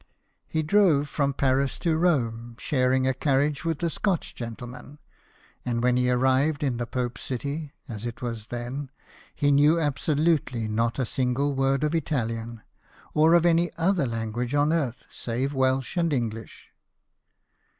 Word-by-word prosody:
He 160 -1 -1
drove 155 -5 +4
from 140 -2 -1
Paris 135 0 +1
to 165 -3 0
Rome, 120 -9 0
sharing 130 -1 +1
a 130 - +2
carriage 140 +2 +1
with 165 0 -2
a 170 - +2
Scotch 190 -2 -1
gentle 115 0 -6
man; 125 +4 -11 0.7
and 120 -1 -1
when 125 0 +3
he 125 0 +2
arrived 130 +4 +2
in 130 -4 0
the 120 0 -3
Pope's 125 0 -3
city 140 +4 -4
(as 110 -4 -7
it 120 - -5 0.3
then 120 +3 -4
was) 140 - -9 0.5
he 145 0 +2
knew 145 +4 +5
absolutely 145 -5 0
not 115 +2 0
a 130 - 0
single 130 +4 0
woi'd 135 +1 +1
of 150 +1 0
Italian, 115 -7 -2 0.5
or 160 +2 +5
of 170 0 +4
any 170 0 +3
other 170 -4 +2
language 115 +3 -3
on 145 +2 +3
earth 140 -8 -2
save 125 +4 -3
Welsh 130 -3 0
and 170 -2 +2
English. 115 -4 -4
135 Hz, 155 wpm, -26 LUFS, 120-150 Hz, 0.7 s, knew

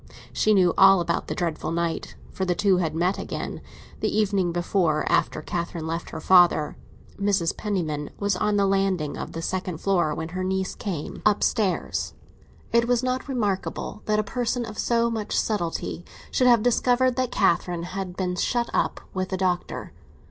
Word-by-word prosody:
She 215 0 +3
knew 180 -3 +4
all 195 -1 +8
about 170 -1 -1
her - - -2
dreadful 165 -2 -2
night, 170 0 -2 0.2
for 190 - -3
the 180 -1 +1
two 195 0 +3
had 160 -3 -1
met 180 +4 +1
again, - - -5 0.4
the - - 0
evening 200 -4 +1
before, 175 -2 +1
after - - +1
Catherine 170 -1 -3
left 165 +1 -3
her - - -6
father. 175 -5 +4 0.4
Mrs. 200 -4 +1
Penniman 160 -8 -2
was 200 -1 0
on 210 +2 +1
the 200 - +3
landing 195 -6 +1
of - - -6
the 165 0 -5
second 185 -2 -2
floor 175 -4 +1
when 160 0 -4
her 185 +2 -3
niece 190 0 -1
came 175 -8 -5
upstairs. 210 -1 +1 0.6
It 235 0 +4
was 245 0 +2
not 255 +2 -1
remarkable 215 -5 -2
that 215 0 +1
a 215 - +2
person 240 +3 -2
of 215 -1 -8
so 235 0 +2
much 220 -2 -2
subtlety 175 -4 -2 0.3
should 250 - +3
have 235 -3 +5
discovered 245 +1 +3
that 255 -1 0
Catherine 175 -2 +1
had 185 0 -5
been 180 -1 -1
shut 235 +6 0
up - - 0
with 185 0 -2
the 190 - -2
Doctor. 180 -1 -2
190 Hz, 175 wpm, -25 LUFS, 175-210 Hz, 0.6 s, all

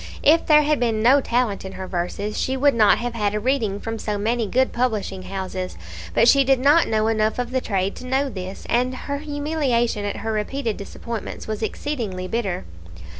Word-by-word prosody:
If 325 +3 +4
there 300 -1 +6
had 300 -1 +1
been 225 -3 0
no 270 +4 +6
talent 235 -5 0
in 190 0 -7
her 190 0 -6
verses, 185 +4 -3
she 265 +1 0
would 285 +1 +4
not 215 -3 +5
have 240 0 -3
had 210 -3 -1
a - - 0
reading 220 -4 0
from 225 +1 -5
so 210 -1 -2
many 225 +2 0
good 260 +5 +1
publishing 215 -6 -1
houses; 185 -1 -5 0.4
but 230 - +5
she 275 +3 +6
did 270 -1 +3
not 290 +5 +5
know 215 -1 +1
enough 220 -1 +1
of 245 0 -3
the 260 0 0
trade 195 -3 -1
to 255 - -8
know 265 +2 +1
this, 190 -5 -7
and 250 +2 +1
her 280 +2 -4
humiliation 290 -7 -1
at 205 - -3
her 225 - 0
repeated 225 +2 -2
disappointments 225 +3 -6
was 215 0 -4
exceedingly 220 -7 -3
bitter. 195 - -2
230 Hz, 200 wpm, -22 LUFS, 205-260 Hz, 0.4 s, there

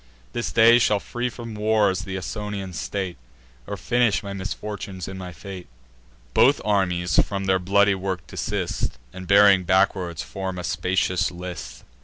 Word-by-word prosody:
This 120 - -2
day 115 +1 +6
shall 105 -3 +3
free 120 +4 -3
from 115 -2 -8
wars 105 -3 +1
th' 95 -1 -4
Ausonian 95 +1 -5
state, 95 +1 -4 0.5
Or - - -4
finish 120 -3 +1
my 100 -1 -5
misfortunes 100 -1 -5
in 95 - -6
my 90 -1 -7
fate." 90 +2 -9 0.7
Both - - +5
armies 90 -4 +2
from 100 -1 -3
their 95 -1 +3
bloody 100 +2 +3
work 95 -3 -3
desist, - - -3 0.2
And, 95 -1 -8
bearing 100 -1 +6
backward, 95 -2 +1
form 95 -1 -4
a 90 - -5
spacious 90 +1 0
list. 90 -2 -8
95 Hz, 150 wpm, -24 LUFS, 90-105 Hz, 0.7 s, day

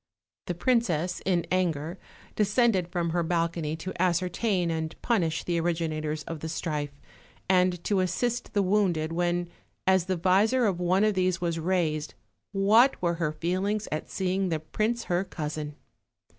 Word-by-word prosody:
The 175 - -2
princess 180 -6 +1
in 175 -3 +2
anger 170 -2 0 0.4
descended 210 -3 +2
from 175 -2 -1
her 175 +1 +1
balcony 165 -2 -1
to 180 +4 -6
ascertain 180 +1 +1
and 160 -1 -3
punish 170 -10 +1
the 170 -1 0
originators 155 -2 -1
of 165 0 -6
the 160 - -5
strife, 150 -3 -3 0.5
and 180 -2 +2
to 200 -2 +1
assist 225 +7 -1
the 205 -2 +2
wounded, 185 -5 +1
when, 175 +1 0 0.4
as 190 -2 +4
the 185 -1 -1
visor 205 +8 +3
of 190 -4 0
one 180 +3 +2
of 215 0 +3
these 185 -2 +1
was 170 -2 -1
raised, 160 -3 0 0.4
what 215 +7 +4
were 170 -1 +1
her 155 -2 +1
feelings 185 +7 -1
at 155 - -3
see 185 -1 -1
ing 190 -1 0
the 160 -2 0
prince 215 +9 -1
her 175 +1 0
cousin! 150 -4 -5
175 Hz, 155 wpm, -27 LUFS, 165-195 Hz, 0.5 s, as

